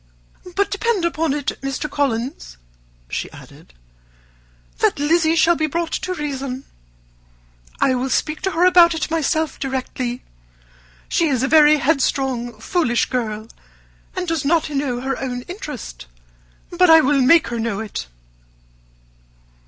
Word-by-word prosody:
"But 400 0 +1
depend 405 -3 0
upon 325 -2 0
it, 285 -1 -3
Mr. 275 +2 -3
Collins," 255 - -3 0.5
she - - -4
added, - - -15 1.0
"that - - +2
Lizzy 320 +3 +2
shall 340 +1 +4
be 310 -1 0
brought 335 +2 -2
to 365 0 -3
reason. 275 -4 -4 1.2
I 265 - +3
will 255 +1 -1
speak 310 +3 -1
to 385 - -1
her 340 +2 +3
about 345 -2 +6
it 320 0 -3
myself 315 0 0
directly. 255 -2 -3 0.8
She 335 - +1
is 260 -4 0
a - - +2
very 305 0 +6
headstrong, 265 -5 0
foolish 240 - 0
girl, 220 -4 -3 0.7
and 365 -1 -3
does 330 -4 -1
not 310 +1 +1
know 275 -4 -2
her 270 0 -3
own 245 -2 -4
interest; 255 - -8 0.6
but 360 0 +3
I 320 0 +9
will 280 -1 +2
make 285 +5 +5
her 235 0 -3
know 225 -3 -2
it." 215 - -5
285 Hz, 135 wpm, -20 LUFS, 250-330 Hz, 1.2 s, I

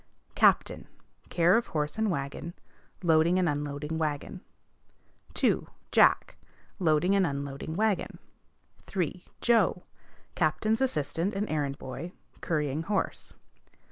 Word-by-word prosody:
Captain. - - +3 0.4
Care 175 +1 +4
of 235 - -1
horse 150 -1 -2
and 220 -1 0
wagon; 140 +1 -4 0.5
loading 165 +1 +4
and 185 -1 +2
unloading 145 +1 -2
wagon. 155 +5 -3 0.9
2. - - +1 0.2
Jack. - - +4 0.4
Loading 175 +2 +3
and 195 - +4
unloading 140 +2 -4
wagon. 215 0 0 0.7
3. 180 -1 -2 0.2
Joe. 220 -6 +3 0.5
Captain's 215 +9 +1
assistant 175 - 0
and 205 +2 -1
errand 145 -3 -1
boy; 170 +7 -7 0.3
currying 150 -2 -1
horse. 195 +4 -2
165 Hz, 110 wpm, -29 LUFS, 150-190 Hz, 0.9 s, Care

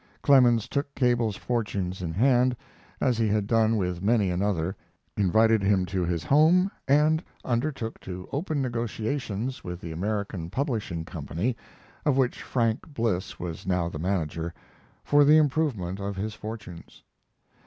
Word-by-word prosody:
Clemens 125 -5 +5
took 140 0 -3
Cable's 120 -5 +2
fortunes 100 -6 -2
in 85 -2 -3
hand, 125 +5 +3 0.4
as 125 -3 +1
he 115 - +2
had 105 -1 +1
done 115 0 +3
with 90 -3 -2
many 105 -2 +2
another, 95 -1 -1 0.4
invited 110 +3 +3
him 95 -1 +2
to 90 0 -2
his 85 -2 -1
home, 165 - +4 0.2
and 150 +4 +3 0.2
undertook 120 -2 -2
to 90 -1 -7
open 150 -1 -1
negotiations 120 0 -3
with 90 -1 -6
the 85 - -7
American 100 -1 -3
Publishing 110 - -2
Company, 85 - -3 0.5
of 145 -5 +2
which 130 -2 +1
Frank 115 +4 -1
Bliss 110 -8 -2
was 85 0 -6
now 90 -2 +1
the 75 - -7
manager, 85 -2 -2 0.5
for 145 0 +5
the 150 +2 +7
improvement 135 - +1
of 100 0 -3
his 105 +3 -3
fortunes. 105 -6 -9
110 Hz, 145 wpm, -27 LUFS, 90-130 Hz, 0.5 s, the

